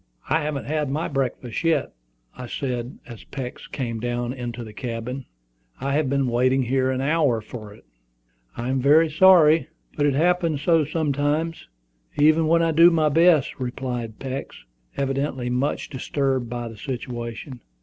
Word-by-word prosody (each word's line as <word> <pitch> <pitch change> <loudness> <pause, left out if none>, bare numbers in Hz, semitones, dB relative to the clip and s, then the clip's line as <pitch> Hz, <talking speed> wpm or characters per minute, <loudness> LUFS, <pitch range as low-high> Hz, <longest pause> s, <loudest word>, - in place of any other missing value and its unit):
"I 160 - +3
haven't 150 -2 -3
had 150 -1 -1
my 150 +4 -1
breakfast 130 -2 -3
yet," 165 -1 +1 0.4
I 125 - -7
said, 125 -1 -4
as 120 -6 -11
Peeks 130 -3 -7
came 115 -4 -4
down 120 +1 -2
into 120 -2 -5
the 110 -2 -10
cabin. 120 +3 -5 0.5
"I 140 +1 -2
have 145 -2 +1
been 140 0 +1
waiting 130 +2 +2
here 130 +1 +1
half 130 - 0
an 130 - -2
hour 145 -4 +2
for 110 -1 -9
it." 105 - -17 0.7
"I 120 +2 -3
am 130 0 0
very 155 +4 +5
sorry, 165 -2 +6 0.3
but 145 -1 +2
it 140 - +1
happens 165 -2 +1
so 165 -1 +3
sometimes, 150 - -1 0.5
even 155 +2 +4
when 165 +1 +4
I 165 - +2
do 165 +2 +7
my 160 -3 +2
best," 160 -3 +3
replied 125 -3 -4
Peeks, 135 - -6 0.3
evidently 135 -2 -1
much 130 +4 -1
disturbed 130 -2 -1
by 120 0 -4
the 115 -1 -10
situation. 120 0 -6
135 Hz, 160 wpm, -23 LUFS, 125-155 Hz, 0.7 s, do